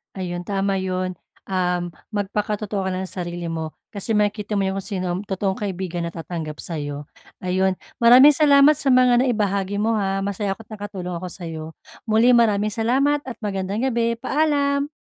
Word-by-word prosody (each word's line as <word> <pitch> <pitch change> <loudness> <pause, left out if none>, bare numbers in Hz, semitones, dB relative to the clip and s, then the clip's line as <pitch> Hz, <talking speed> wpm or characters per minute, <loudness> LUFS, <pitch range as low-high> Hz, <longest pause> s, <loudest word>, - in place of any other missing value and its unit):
Ayun, 175 -2 -4
tama 195 -1 0
'yon, 185 -1 -2 0.3
um, 180 -2 0 0.2
magpakatotoo 205 -1 -2
ka - - 0
lang 185 +1 -2
ng 190 - -6
sarili 175 -1 -5
mo 160 -1 -4 0.2
kasi 205 +2 -2
makikita 210 0 0
mo 200 - +1
yung 190 0 -2
kung 195 - -4
sino 190 -4 -3
ang - - -4
totoong 195 0 -1
kaibigan 185 -4 -3
natatanggap 165 -2 -6
sayo. 145 -3 -5 0.3
Ayun, 185 +1 +1 0.3
maraming 250 +5 +8
salamat 290 -1 +6
sa 285 - -3
mga 250 0 +5
naibahagi 200 -4 0
mo, 225 0 +1
ha, 195 -1 0
masaya 200 0 -2
ako't 225 - -16
nakatulong 195 -4 -5
ako 180 +2 -6
sayo, 165 -3 -6 0.4
muli 220 +3 +4
maraming 215 -3 +3
salamat 265 +6 +2
at 255 -3 -6
magandang 200 0 -2
gabi, 235 -1 +1
paalam! 285 0 +1
200 Hz, 165 wpm, -22 LUFS, 185-225 Hz, 0.4 s, maraming